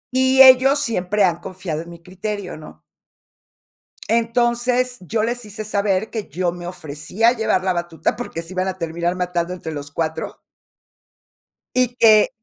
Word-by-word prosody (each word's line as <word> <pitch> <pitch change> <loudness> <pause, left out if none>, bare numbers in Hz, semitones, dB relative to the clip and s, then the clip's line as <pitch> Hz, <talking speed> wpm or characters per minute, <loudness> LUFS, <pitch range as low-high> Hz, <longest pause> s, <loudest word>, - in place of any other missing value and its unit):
Y 260 +1 +6
ellos 265 +2 +7
siempre 210 -5 0
han 175 -2 +2
confiado 180 -4 -5
en 170 - -11
mi 170 -1 -11
criterio, 190 +1 -5
¿no? 155 0 -13 1.3
Entonces, 240 +2 +1
yo 215 +4 -2
les 240 0 -2
hice 210 +1 -7
saber 205 -1 0
que 220 -3 -5
yo 180 -1 -1
me 175 0 -8
ofrecía 180 +6 -1
a - - +3
llevar 220 -5 0
la 185 - +1
batuta, 170 -1 -2
porque 245 -8 -5
se 165 +3 -10
iban 185 +1 -1
a 190 0 -3
terminar 170 +1 -2
matando 180 -1 -2
entre 165 -3 -6
los 145 -1 -7
4. 160 +1 -3 1.4
Y, 250 -1 +1
que 215 -2 +6
190 Hz, 160 wpm, -20 LUFS, 175-230 Hz, 1.4 s, ellos